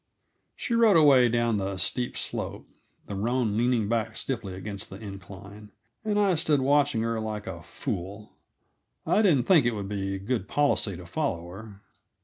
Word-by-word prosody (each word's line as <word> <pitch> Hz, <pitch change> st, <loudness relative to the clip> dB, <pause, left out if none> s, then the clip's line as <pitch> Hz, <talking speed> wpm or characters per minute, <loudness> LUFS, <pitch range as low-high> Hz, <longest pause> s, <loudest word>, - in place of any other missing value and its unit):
She 240 Hz, -, -3 dB
rode 230 Hz, -5 st, +5 dB
away 135 Hz, -6 st, +6 dB
down 120 Hz, -1 st, +1 dB
the 95 Hz, -1 st, -3 dB
steep 120 Hz, +7 st, -2 dB
slope, -, -, -4 dB, 0.4 s
the -, -, -7 dB
roan 115 Hz, +2 st, 0 dB
leaning 120 Hz, -2 st, +2 dB
back 110 Hz, 0 st, -1 dB
stiffly 110 Hz, -8 st, -4 dB
against 100 Hz, +1 st, -6 dB
the 95 Hz, -, -9 dB
incline, 100 Hz, 0 st, -10 dB, 0.3 s
and 210 Hz, -1 st, 0 dB
I 200 Hz, -2 st, +3 dB
stood 155 Hz, -3 st, +2 dB
watching 140 Hz, -3 st, +2 dB
her 115 Hz, 0 st, -1 dB
like 110 Hz, -1 st, -4 dB
a 85 Hz, -4 st, -6 dB
fool. 100 Hz, +4 st, -6 dB, 0.7 s
I 215 Hz, -, +3 dB
didn't 160 Hz, -, +4 dB
think 170 Hz, -7 st, +6 dB
it 120 Hz, -, 0 dB
would 100 Hz, -2 st, -4 dB
be 95 Hz, -1 st, -2 dB
good 100 Hz, 0 st, -2 dB
policy 125 Hz, -10 st, +1 dB
to 90 Hz, -, -10 dB
follow 85 Hz, -, -2 dB
her. 100 Hz, +2 st, -11 dB
110 Hz, 165 wpm, -27 LUFS, 100-135 Hz, 0.7 s, away